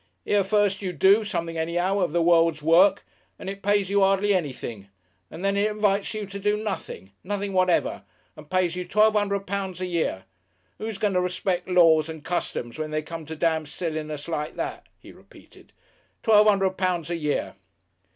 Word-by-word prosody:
Here 205 -1 +2
first 205 0 +1
you 185 -2 -3
do 195 +7 +4
something 165 -5 -3
anyhow 175 +4 0
of 180 -5 0
the 170 +1 +1
world's 165 -3 +3
work, 180 +5 +4 0.3
and - - -9
it 195 +1 -6
pays 205 -1 +2
you 200 0 +3
hardly 195 +1 +3
anything, 130 - -4 0.4
and 170 +4 -7
then 195 0 +1
it 205 +2 +2
invites 210 0 0
you 215 -1 -3
to 200 +1 -8
do 205 +1 +1
nothing, 200 - -6
nothing 200 +1 -3
whatever, 185 - +1 0.3
and 155 -1 -14
pays 185 -2 +1
you 180 - -3
twelve 215 +3 +4
hundred 200 -2 0
pounds 190 -2 -4
a 185 - -2
year. 170 - -2 0.6
Who's 220 -2 -4
going 210 -2 0
to 180 - +2
respect 180 0 -2
laws 165 -3 +5
and 160 -2 -8
customs 155 -7 -3
when 155 0 -3
they 155 0 -2
come 165 0 -8
to 160 - -6
damn 160 -1 0
silliness 155 -2 -5
like 150 -2 -3
that?" - - -5
He - - -14
repeated, - - -19 0.5
"Twelve 215 -1 +5
hundred 195 -2 +2
pounds 175 -3 -1
a - - 0
year!" 150 -3 -2
185 Hz, 185 wpm, -25 LUFS, 165-200 Hz, 0.6 s, laws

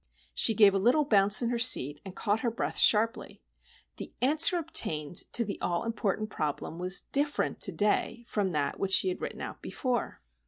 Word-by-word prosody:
She 225 - +1
gave 200 -2 +5
a 195 - 0
little 250 +9 +2
bounce 205 -2 +3
in 235 - -1
her 240 - -2
seat, 150 - +3
and 190 -1 -10
caught 210 0 -1
her 235 - -1
breath 230 - -4
sharply. 225 +1 +3 0.6
The - - -8
answer 310 +7 +3
obtained 165 - -1 0.2
to 235 - +1
the 200 - -7
all 175 -1 -2
important 215 -2 -3
problem 155 +2 -4
was 185 +1 -1
different 290 +1 0
to - - +1
day 210 +3 -1
from 205 -5 -2
that 150 -3 -2
which 190 -1 -2
she 190 - +4
had 180 - -5
written - - -6
out - - -8
before! 250 -3 -4
210 Hz, 190 wpm, -28 LUFS, 190-240 Hz, 0.6 s, gave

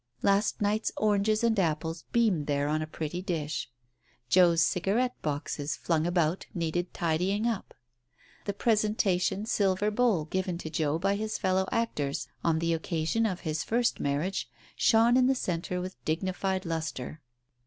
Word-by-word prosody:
Last 200 +2 +2
night's 210 +2 +1
oranges 215 +1 +2
and 225 -3 +3
apples 160 -1 -1
beamed 210 -11 +2
there 145 -1 +1
on 155 +1 0
a 155 - -3
pretty 160 +3 -4
dish. 155 -8 -3 0.6
Joe's 170 0 +5
cigarette 205 +10 +1
boxes, 145 0 -2
flung 165 -1 0
about, 175 0 0
needed 175 +1 -1
tidying 180 +5 0
up. 230 -4 -2 0.7
The 200 - -1
presentation 210 -3 +1
silver 200 -1 +1
bowl 210 -8 +2
given 185 +1 -2
to 160 -2 -7
Joe 155 -1 0
by 195 +3 +1
his 215 0 -2
fellow 190 -1 +1
actors 150 -12 -1 0.2
on 165 -1 +2
the 165 +1 +1
occa 160 -1 -2
sion 225 +6 +2
of 185 -3 -4
his 155 -2 -2
first 235 +1 +1
marriage, 145 +7 -1 0.3
shone 230 +2 +4
in 255 -1 +5
the 265 - +3
centre 180 -4 -2
with 185 +1 -7
digni 175 +4 -1
fied 190 0 -2
lustre. 155 -3 -4
180 Hz, 155 wpm, -29 LUFS, 160-210 Hz, 0.7 s, Joe's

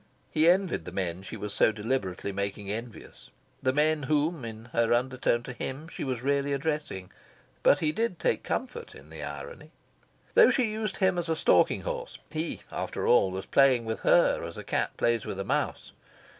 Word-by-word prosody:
He 155 +2 +4
envied 185 0 +2
the - - -6
men 90 -2 -2
she 95 - -7
was 105 -1 -5
so - - +4
deliberately 105 -3 -2
making 100 0 -3
envious 115 +2 -8 0.3
the 130 - +2
men 150 +2 +2
whom, 150 +1 0
in 110 -1 -7
her 115 -1 +2
undertone 125 -1 0
to 125 - -7
him, 135 +5 -5
she - - -6
was 130 -3 -3
really 140 0 +1
addressing. 145 - -3 0.5
But 145 - +4
he 155 -1 +2
did 225 0 -1
take - - 0
comfort - - -4
in 75 +3 -14
the 80 -1 -8
irony. 75 - -7 0.6
Though 475 -2 +8
she 240 -5 +2
used 215 -2 -3
him 190 -2 +2
as 170 -1 -3
a 160 - +2
stalking - - +3
horse, - - -5
he, 160 +1 -3
after - - -3
all, 95 - +5
was 95 +1 -5
playing 130 -4 +4
with 110 0 -3
her 175 - +4
as 85 0 -7
a - - -6
cat - - -2
plays 120 -2 +1
with 95 - -4
a 100 - -3
mouse. - - -2
130 Hz, 190 wpm, -28 LUFS, 105-155 Hz, 0.6 s, Though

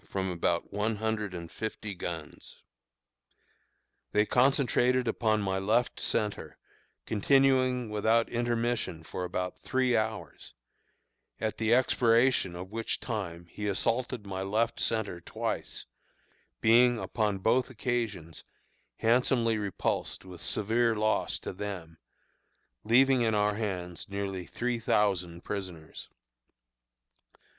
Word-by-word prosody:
from 95 -1 -2
about 85 +1 -1
one 105 +2 0
hundred 110 -1 -2
and 85 -2 -7
fifty 110 -1 -5
guns. 85 -4 -7 1.6
They 105 0 +4
concentrated 125 0 +3
upon 110 -2 +1
my 95 -1 0
left 110 +5 +1
centre, 105 -1 -1 0.5
continuing 130 +2 +3
without 110 +2 +2
intermission 120 -7 -1
for 90 - -5
about 90 0 -3
three 130 -2 +1
hours, 110 -1 -3 0.8
at 110 -1 -2
the 110 +1 +4
expiration 120 -5 +3
of 90 +2 -7
which 115 +1 -2
time 90 -7 -4
he 105 +5 -6
assaulted 115 +3 -1
my 95 -1 -4
left 110 +4 0
centre 105 -6 -1
twice, - - -4 0.8
being, 120 +2 +5
upon 105 0 -1
both 120 +7 +2
occasions, 110 -9 -3 0.5
handsomely 115 -1 +2
repulsed 100 -1 -2
with 90 -2 -10
severe 115 +2 +1
loss 110 0 +1
to - - -6
them, 90 -5 -6 0.8
leaving 130 +3 +5
in 110 -2 +2
our 105 0 +2
hands 90 -6 -4
nearly 100 -3 -4
three 120 -1 -2
thousand 90 -6 +1
prisoners. 90 -6 -6
110 Hz, 110 wpm, -29 LUFS, 95-120 Hz, 1.6 s, being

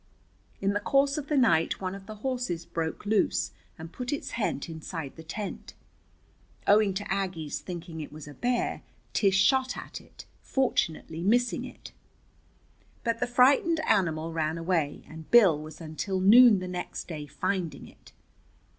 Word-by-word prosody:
In 195 +1 +1
the 205 - 0
course 275 +5 +2
of 290 - -7
the 300 - +1
night 225 -11 +3
one 185 -1 -3
of 195 0 -10
the 215 - -7
horses 245 -11 -2
broke 165 +3 -4
loose 210 0 +1 0.3
and 160 +1 -9
put 250 0 -4
its 290 - -3
head 210 -11 -2
inside 160 -2 -6
the 160 - -10
tent. 200 +6 -6 0.9
Owing 205 -2 +4
to 205 0 -2
Aggie's 180 -6 -3
thinking 170 -3 -7
it 150 - -8
was 150 -1 -10
a 145 - -9
bear, 245 - -1 0.3
Tish 195 -2 +3
shot 260 +5 +3
at - - -8
it, - - -14 0.2
fortunately 165 - -1
missing 240 +6 +2
it. - - -11 1.1
But 230 -1 0
the 245 - 0
frightened 270 +7 +4
animal 165 - +1
ran 160 0 -1
away, 165 -4 -1
and 160 0 -11
Bill 190 -11 +6
was 155 +1 -10
until 170 +4 -3
noon 220 +3 +8
the 185 0 -4
next 180 -1 -5
day 150 -4 -6
finding 180 +2 -3
it. - - -18
190 Hz, 160 wpm, -28 LUFS, 160-240 Hz, 1.1 s, noon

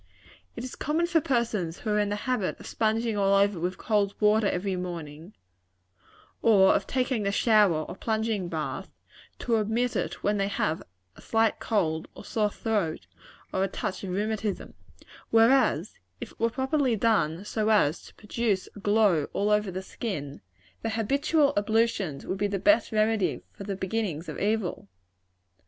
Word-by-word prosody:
"It - - -6
is 255 - -6
common 315 +4 0
for 340 -2 +2
persons 225 - -1
who 215 - -2
are 210 - +2
in 205 -1 +1
the 205 - -1
habit 250 -7 -1
of - - -11
sponging 225 0 0
over 200 -1 +3
with 180 +2 -2
cold 205 -2 0
water 210 0 +4
every 190 +1 -1
morning, 170 -1 -7 1.1
or 200 -4 +6
of 195 - 0
taking 255 -3 0
the 200 -1 0
shower 205 -7 +3
or - - -8
plunging 220 -3 -1
bath, 155 +3 -4 0.5
to 230 -2 0
omit 220 +3 0
it - - -3
when 205 0 +1
they 195 0 +1
have 160 -5 -1 0.3
a - - -15
slight 225 -1 +1
cold, 160 -8 0
or - - -11
sore 210 -2 0
throat, 200 - -2 0.5
or 190 - +1
a - - +1
touch 190 - -4
of 190 - -4
rheumatism; 210 +1 -2 0.6
whereas, 225 - +3 0.2
if - - -7
it - - -22
were 230 - +2
properly 265 0 +1
done 200 -5 +1
so 215 0 -1
as 175 -8 +3
to - - -17
produce 210 -2 -1
a - - -9
glow 205 -7 +3
all 205 +1 +1
over 210 -1 +2
the 185 +1 -5
skin, 150 -10 -5 0.4
their 225 -1 -2
habitual 280 +6 +2
ablutions 205 -7 0
would 190 - -3
be 205 - +1
the 200 0 -2
best 270 +3 +3
remedy 215 -2 +1
for 200 - -9
the 200 -1 -3
beginnings 190 -4 -3
of - - -6
evil. 205 - -1
210 Hz, 170 wpm, -27 LUFS, 190-225 Hz, 1.1 s, or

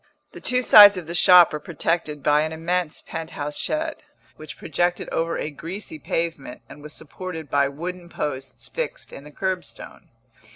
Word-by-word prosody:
The - - -12
two 250 0 +1
sides 205 -4 +9
of 180 - -6
the 170 - -6
shop 175 -1 +7
were 150 - -3
protected 155 -2 -2
by 150 0 +4
an 155 +1 -2
immense 170 0 -2
pent 165 0 -7
house 145 0 -4
shed, 315 0 -2 0.4
which 155 -1 -10
projected 175 +3 -1
over 165 +1 -1
a 150 - -4
greasy 195 - -8
pavement 165 - -4
and 145 - -13
was 150 0 -9
supported 160 -1 -7
by 140 -1 +3
wooden 175 +4 -7
posts 135 -5 -5
fixed - - -5
in 140 - -10
the 150 - -12
curbstone. 185 +3 -5
165 Hz, 170 wpm, -23 LUFS, 150-180 Hz, 0.4 s, sides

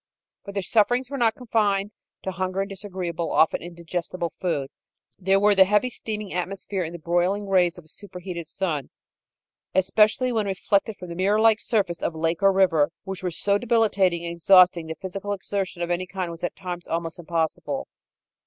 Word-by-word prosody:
But 200 -1 -9
their 200 - -1
sufferings 245 +6 +2
were 280 - -3
not 225 -2 +3
confined 210 -4 0 0.3
to 190 - -2
hunger 185 +1 -2
and 195 - -2
disagreeable 185 -4 -4
often 160 - +3
indigestible 170 0 -4
food. 145 -7 -1 0.5
There 195 +1 +3
were 205 +1 +5
the 190 -1 +7
heavy 210 +5 +2
steaming 215 -3 -5
atmosphere 190 +2 -3
and 170 0 -4
the - - -5
broiling 175 +5 0
rays 180 -2 +3
of 175 - -12
a - - -22
superheated 180 -2 -8
sun, 160 -7 -2 0.9
especially 210 +6 +3
when 220 -3 0
reflected 200 +2 0
from 180 - -9
the 170 - -6
mirror 200 +4 +2
like 220 -1 +5
surface 200 -8 -1
of 165 - -2
lake 165 +2 -1
or 195 0 +6
river, 180 -6 +3
which 190 -2 -6
were 185 - -1
so 200 +4 +1
debilitating 200 -7 +2
and 170 - -3
exhausting 180 -1 +5
that 160 -1 -6
physical 195 +2 -4
exertion 190 -2 -3
of 170 - -2
any 180 +1 -1
kind 185 -2 -4
was 165 0 -10
at 175 - -2
times 180 -2 -6
almost 165 0 -3
impossible. 160 -3 -2
185 Hz, 180 wpm, -25 LUFS, 170-205 Hz, 0.9 s, the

